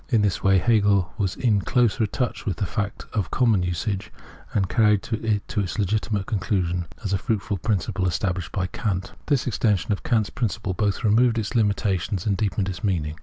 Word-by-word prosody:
In 115 -6 +3
this 100 -3 0
way 95 0 +5
Hegel 100 -3 +3
was 95 -3 0
in 110 -5 +2
closer 115 0 +2
touch 125 +3 -3
with 100 - -2
fact 100 0 -3
and 100 -5 -1
common 115 -7 +3
usage, 90 +3 -2 0.4
and 95 -2 +1
carried 105 +2 +3
to 115 -1 -3
its 105 -3 -1
legitimate 105 0 0
conclusion 90 -4 -1 0.2
the 100 -1 0
fuuitful 105 -3 -1
principle 100 -2 0
established 90 -1 -1
by 95 -2 -1
Kant. 95 -1 -3
This 140 -4 +2
extension 105 -4 +1
of 100 - -1
Kant's 110 -4 +1
principle 110 -4 -2
both 100 +3 -1
removed 115 +2 +4
its 110 0 -2
limitations 100 -4 0
and 100 -2 +2
deepened 100 -1 -1
its 95 +3 -5
meaning. 80 -7 0
100 Hz, 170 wpm, -24 LUFS, 95-110 Hz, 0.4 s, way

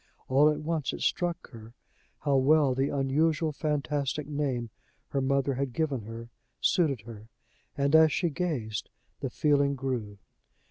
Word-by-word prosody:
All 140 +3 +5
at 150 - 0
once 155 -2 -2
it - - -6
struck 175 -2 -1
her 115 -1 -12 0.5
how 140 -2 +2
well 140 0 +4
the 135 +2 0
unusual, 155 +4 +1
fantastic 150 -1 -2
name 135 -6 -2 0.4
her 140 - -1
mother 140 +1 +1
had 130 -1 -2
given 140 -3 -1
her 115 +1 -8 0.3
suited 145 - +2
her; 110 0 -11 0.5
and, 140 +2 +2
as 160 -1 +7
she 170 +2 0
gazed, 135 - -3 0.3
the - - -3
feeling 140 -2 +2
grew. 125 -6 -3
140 Hz, 145 wpm, -28 LUFS, 130-150 Hz, 0.5 s, as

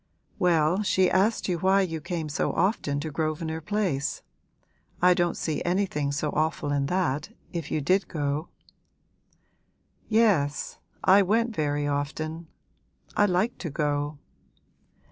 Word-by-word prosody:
'Well, 170 -1 +3
that 210 -1 -1
she 185 -1 +3
asked 205 +4 +2
you 175 -3 -1
why 190 +3 +4
you 165 -4 -2
came 165 0 -3
so 145 - -1
often 165 -6 0
to 155 +1 -4
Grosvenor 160 +1 -2
Place. 175 -6 -1 0.8
I 180 +1 +6
don't 175 -1 0
see 155 -2 -2
anything 175 -6 0
so 145 +1 -1
awful 155 -1 -1
in 140 -1 +1
that, 165 -3 0 0.2
if 165 -4 -4
you 155 - -1
did 185 +6 +2
go.' 145 +1 -2 1.6
'Yes, 200 -11 +2 0.2
I 195 +2 +7
went 225 +4 +1
very 145 -2 0
often. 155 +3 -3 0.7
I 205 - +4
liked 190 +6 0
to 165 - -4
go.' 145 0 -1
160 Hz, 135 wpm, -26 LUFS, 145-190 Hz, 1.6 s, I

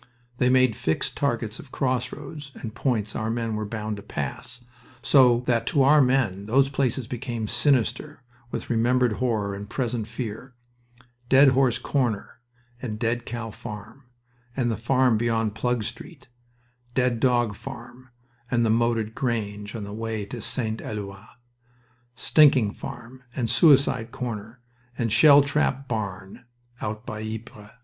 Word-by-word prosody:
They 125 - +3
made 130 -3 +4
fixed 80 -4 -1
targets 115 -5 -1
of 130 - -12
crossroads 140 +3 -3
and 110 -3 -7
points 115 -4 -1
our 110 0 -2
men 115 -1 -2
were 105 -1 -3
bound 110 -1 -4
to - - -8
pass, 120 +4 -5 0.4
so 125 -4 +5
that 120 -2 +1
to 145 -5 +3
our 150 +2 +6
men 125 -7 +1
those 135 +5 +3
places 135 -2 0
became 120 -2 -4
sinister 140 +3 +1 0.3
with - - -5
remembered 120 +1 +2
horror 110 -5 0
and 100 +1 -7
present 120 -4 -2
fear: 120 +2 -6 0.7
Dead 135 +1 +7
Horse 130 -2 +3
Corner 120 -6 -2 0.4
and 110 -4 -4
Dead 115 +1 -1
Cow 115 -1 -5
Farm, 105 +1 -9 0.5
and 120 -3 +1
the - - -1
farm 125 0 +2
beyond 115 -2 0
Plug 120 0 -1
Street; - - -8 0.7
Dead 125 -3 +1
Dog 120 -3 +2
Farm 125 +1 -10 0.4
and 120 -1 +2
the 110 - +3
Moated 115 -1 +1
Grange 105 -4 -3
on 110 - -4
the 100 0 -7
way 110 -1 -3
to 115 +3 -7
St. 115 -1 -2
Eloi; 100 -2 -6 0.9
Stinking 130 -5 +4
Farm 125 +3 -9
and 115 -4 0
Suicide 135 -6 +4
Corner 115 -1 -6 0.4
and 115 -3 0
Shell 140 +4 +8
trap 140 -1 0
Barn, 100 -2 -5 0.4
out 110 +2 -4
by 110 0 -5
Ypres. 110 -1 -7
120 Hz, 145 wpm, -25 LUFS, 110-130 Hz, 0.9 s, Shell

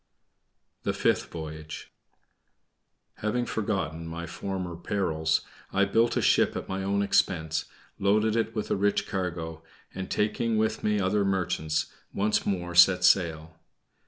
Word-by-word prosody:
THE - - -1
FIFTH - - +1
VOYAGE 80 -1 -7 1.3
Having 120 +3 -1
forgotten 85 -9 -2
my 85 +1 -5
former 90 0 -4
perils, 80 -4 0 0.3
I 100 +1 +3
built 115 +4 +2
a - - +1
ship - - +3
at - - -4
my 95 0 -3
own 100 +1 +1
expense, 80 -5 +1 0.3
loaded 105 +2 +2
it 115 0 0
with 105 - -3
a - - +3
rich 100 +1 +1
cargo, 85 -4 -3 0.3
and, 95 -1 -5
taking 110 +2 0
with 110 0 0
me 105 -1 +2
other 100 +2 +2
merchants, 90 -5 -1 0.2
once 105 +2 +1
more 90 -3 -2
set 90 +1 +6
sail. 80 -4 +2
95 Hz, 135 wpm, -27 LUFS, 80-105 Hz, 1.3 s, set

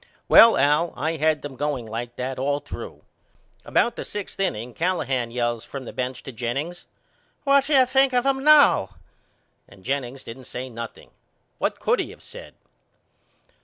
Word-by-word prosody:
Well 230 0 +8
Al 150 +4 +2
I 160 +3 -1
had 155 0 +1
them 145 -2 -7
going 140 -3 -2
like 115 +2 -6
that 130 +1 -4
all 140 +2 0
through. - - -9 0.6
About 235 0 +1
the - - -5
sixth 205 -2 -7
inning 125 - -2
Callahan 135 -8 -1
yells 120 -1 -2
from 135 +2 -8
the - - -8
bench 125 0 -4
to 135 - -7
Jennings 135 +9 -4 0.6
What 275 -1 +4
do 295 0 +1
you 260 -1 +6
think 270 +1 +3
of 250 0 +1
him 270 -1 +1
now? 295 - +5 0.7
And 100 -2 -17
Jennings 135 0 -3
didn't 125 +3 -10
say 130 +2 -6
nothing. 115 -1 -9 0.5
What - - -1
could - - +1
he - - -3
of - - -19
said? - - -12
140 Hz, 165 wpm, -24 LUFS, 120-190 Hz, 0.7 s, Well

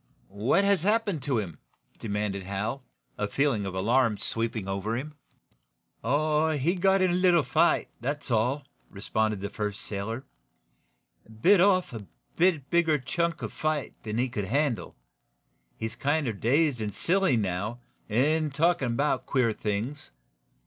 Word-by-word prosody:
"What 195 - +4
has 200 -3 +3
happened 205 -4 +1
to 130 -1 0
him?" 95 -7 -4 0.4
demanded 105 -2 -2
Hal, 100 +8 -3 0.4
a - - 0
feeling 130 -8 0
of 95 - -5
alarm 115 +3 +2
sweeping 115 -3 -2
over 100 +4 -2
him. 150 +4 -6 0.9
"Oh, 150 +5 +2
he 155 +6 +1
got 190 +1 +3
in 185 - +3
a - - 0
little 180 -3 +4
fight 130 - +2
that's 145 +2 -3
all," 125 +5 +1 0.2
responded 110 +1 -1
the 100 +1 -4
first 105 -1 -3
sailor. 110 +6 -4 1.2
"Bit 195 -1 +6
off 185 -4 +3
a 115 - -5
little 105 -3 -10 0.3
bit 160 -6 +2
bigger 165 -3 +3
chunk 170 +6 -2
of - - -5
fight 155 -2 -2
than 110 0 -4
he 125 +2 +2
could 105 -5 -3
handle. 135 +2 -1 0.8
He's 110 0 -4
kinder 140 0 0
dazed 130 +4 +1
and 105 -2 -3
silly, 185 -5 +2
now, 100 +3 -2 0.3
and 150 +7 +2
talkin' 150 -4 +1
about 145 +5 0
queer 125 -5 +2
things. 110 - -3
130 Hz, 150 wpm, -27 LUFS, 110-155 Hz, 1.2 s, Bit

